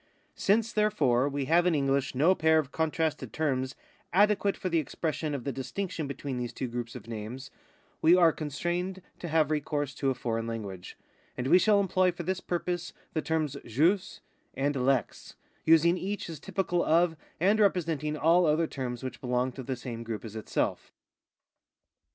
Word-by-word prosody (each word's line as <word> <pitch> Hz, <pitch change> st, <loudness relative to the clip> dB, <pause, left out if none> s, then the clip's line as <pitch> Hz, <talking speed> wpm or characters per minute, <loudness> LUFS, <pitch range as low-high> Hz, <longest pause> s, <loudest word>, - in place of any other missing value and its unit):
Since, 220 Hz, +3 st, +1 dB
therefore, 145 Hz, -, +2 dB
we 140 Hz, -1 st, -2 dB
have 170 Hz, +5 st, +4 dB
in 175 Hz, -, +3 dB
English 135 Hz, -2 st, 0 dB
no 160 Hz, +8 st, +5 dB
pair 160 Hz, -3 st, +3 dB
of 145 Hz, -3 st, 0 dB
contrasted 160 Hz, -1 st, -1 dB
terms 130 Hz, -4 st, -1 dB, 0.4 s
adequate 205 Hz, +1 st, +3 dB
for -, -, -3 dB
the 170 Hz, -2 st, +2 dB
expression 155 Hz, 0 st, -2 dB
of 130 Hz, -, -5 dB
the 140 Hz, -, -2 dB
distinction 155 Hz, +5 st, -4 dB
between 140 Hz, -2 st, -4 dB
these 120 Hz, -1 st, -4 dB
two 130 Hz, -, -3 dB
groups 120 Hz, -1 st, -5 dB
of -, -, -9 dB
names, 115 Hz, +4 st, -6 dB, 0.5 s
we 165 Hz, +3 st, +7 dB
are 170 Hz, -3 st, +6 dB
constrained 175 Hz, +5 st, -3 dB, 0.2 s
to 175 Hz, -, -5 dB
have 155 Hz, -2 st, +2 dB
recourse 145 Hz, -2 st, -1 dB
to 135 Hz, -, -1 dB
a 130 Hz, -, 0 dB
foreign 115 Hz, -1 st, -2 dB
language, 100 Hz, -6 st, -6 dB, 0.4 s
and 125 Hz, -, -2 dB
we 180 Hz, +7 st, +6 dB
shall 210 Hz, +1 st, +4 dB
employ 185 Hz, -1 st, +2 dB
for 175 Hz, 0 st, -7 dB
this 185 Hz, +2 st, -1 dB
purpose 175 Hz, -1 st, -3 dB, 0.2 s
the 155 Hz, -, 0 dB
terms 155 Hz, -3 st, -1 dB
jus 165 Hz, -, +1 dB, 0.3 s
and 140 Hz, +2 st, 0 dB
lex, 130 Hz, -4 st, -1 dB, 0.3 s
using 165 Hz, +2 st, +5 dB
each 200 Hz, -2 st, -4 dB
as 155 Hz, -, -8 dB
typical 180 Hz, -3 st, -1 dB
of 165 Hz, +1 st, +3 dB, 0.2 s
and 200 Hz, +6 st, +3 dB
representing 165 Hz, -7 st, +1 dB
all 165 Hz, +3 st, +4 dB
other 155 Hz, +2 st, +3 dB
terms 125 Hz, -5 st, -5 dB
which 130 Hz, -1 st, -6 dB
belong 125 Hz, 0 st, 0 dB
to 130 Hz, -, -8 dB
the 130 Hz, +1 st, -3 dB
same 120 Hz, -2 st, -6 dB
group 115 Hz, -1 st, -5 dB
as 110 Hz, -1 st, -8 dB
itself. 110 Hz, -, -2 dB
155 Hz, 175 wpm, -29 LUFS, 130-175 Hz, 0.5 s, we